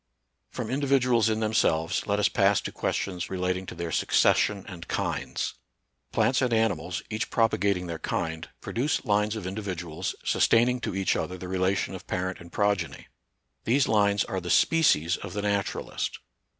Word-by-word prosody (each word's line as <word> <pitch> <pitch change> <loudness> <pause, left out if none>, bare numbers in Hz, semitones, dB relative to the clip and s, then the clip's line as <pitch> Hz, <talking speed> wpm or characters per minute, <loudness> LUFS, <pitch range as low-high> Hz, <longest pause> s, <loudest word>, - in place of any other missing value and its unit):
From - - -5
individuals 130 -4 +3
in 110 0 0
themselves, 85 -7 +1
let 100 0 +1
us 105 - +3
pass 100 0 +3
to - - -5
questions 90 -3 -2
relating 90 0 -2
to - - -7
their 85 -1 -4
succession 100 +4 +2
and 85 -5 -9
kinds. - - -2 0.6
Plants 130 - +2
and 125 -2 +1
animals, 105 -6 0
each 110 0 -2
propagating 100 -5 +1
their 85 -2 -5
kind, 80 0 -3
produce 135 +5 -1
lines 105 0 +1
of 110 -4 -5
individuals, 90 -5 -4
sustaining 120 +2 +3
to 110 - -4
each 95 -1 +1
other 90 - -3
the 90 0 -7
relation 95 +1 0
of - - -9
parent 90 0 -2
and 85 0 -13
progeny. 100 -6 -1 0.6
These 130 +4 +3
lines 100 -1 +3
are 95 - -3
the 90 - -6
species 90 - +4
of - - -8
the 105 -1 -3
naturalist. 100 -1 -2
100 Hz, 160 wpm, -27 LUFS, 90-110 Hz, 0.6 s, species